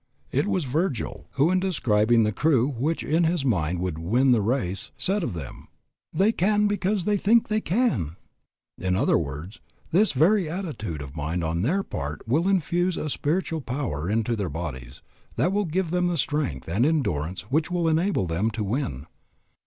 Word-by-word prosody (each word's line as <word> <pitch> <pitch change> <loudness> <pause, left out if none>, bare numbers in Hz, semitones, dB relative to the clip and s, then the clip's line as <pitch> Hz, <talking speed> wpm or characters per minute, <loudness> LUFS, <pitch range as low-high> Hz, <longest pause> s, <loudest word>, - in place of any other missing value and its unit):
It - - +1
was 185 -4 0
Virgil 140 - -2
who 145 +5 +3
in 185 - +3
describing 120 - +2
the 105 - +1
crew 130 +2 +2
which 145 +5 -1
in 165 +3 +2
his 165 -3 0
mind 90 - +1
would 90 -4 -2
win 120 +11 +2
the 120 -3 +4
race, 100 -5 -1
said 200 +2 0
of 100 - -3
them, 75 -7 -8 0.4
They 200 +4 +3
can 210 +1 +2
because 205 -2 0
they 210 -1 +2
think 220 +4 +3
they 215 0 +1
can. 150 - 0 0.6
In 90 0 0
other - - +3
words, 80 +7 -6 0.3
this 200 +3 +4
very 170 +5 +3
attitude 145 - -4
of 70 +1 -10
mind 80 +3 -2
on 80 +1 -1
their 180 - +1
part 75 - -5
will 155 +10 +2
infuse 180 -1 +1
a 150 - -3
spiritual 160 +2 -1
power 120 - -3
into 115 +2 +1
their 100 -5 -2
bodies 70 -6 -6 0.3
that 180 - +1
will 205 +1 +1
give 170 +1 -1
them 180 0 +1
the 175 -1 0
strength 145 - -1
and 95 +8 +1
endurance 105 - 0
which 155 +3 +1
will 175 -2 0
enable 165 - +1
them 90 +6 0
to 110 -1 -3
win. 100 - -2
135 Hz, 180 wpm, -25 LUFS, -, 0.6 s, the